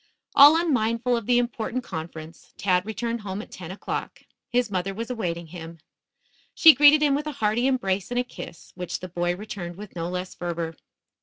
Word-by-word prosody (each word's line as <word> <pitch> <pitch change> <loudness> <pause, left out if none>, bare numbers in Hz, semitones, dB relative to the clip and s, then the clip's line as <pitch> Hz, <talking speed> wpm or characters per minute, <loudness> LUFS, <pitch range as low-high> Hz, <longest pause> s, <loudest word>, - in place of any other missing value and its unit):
All 290 +3 +8
unmindful 245 -6 +1
of 230 -3 -4
the 245 -1 +4
important 245 +1 -2
conference, 160 -3 -8
Tad 185 0 +1
returned 230 +2 -3
home 195 -1 -5
at - - -16
ten 175 -3 -9
o'clock. 190 - -5 0.3
His 245 -3 0
mother 190 +1 -2
was 230 +3 -5
awaiting 175 -8 -3
him. 165 0 -9 0.8
She 320 -1 +9
greeted 295 +1 +6
him 290 -2 +3
with 295 +2 -1
a 300 - -3
hearty 225 +2 +1
embrace 200 -8 0
and 245 0 -1
a - - +1
kiss, 170 -8 -11
which 180 -1 -5
the 185 - -5
boy 175 0 -1
returned 185 -3 -7
with 200 0 -11
no 170 0 -3
less 180 +1 -4
fervor. 170 -2 -4
210 Hz, 185 wpm, -25 LUFS, 175-245 Hz, 0.8 s, She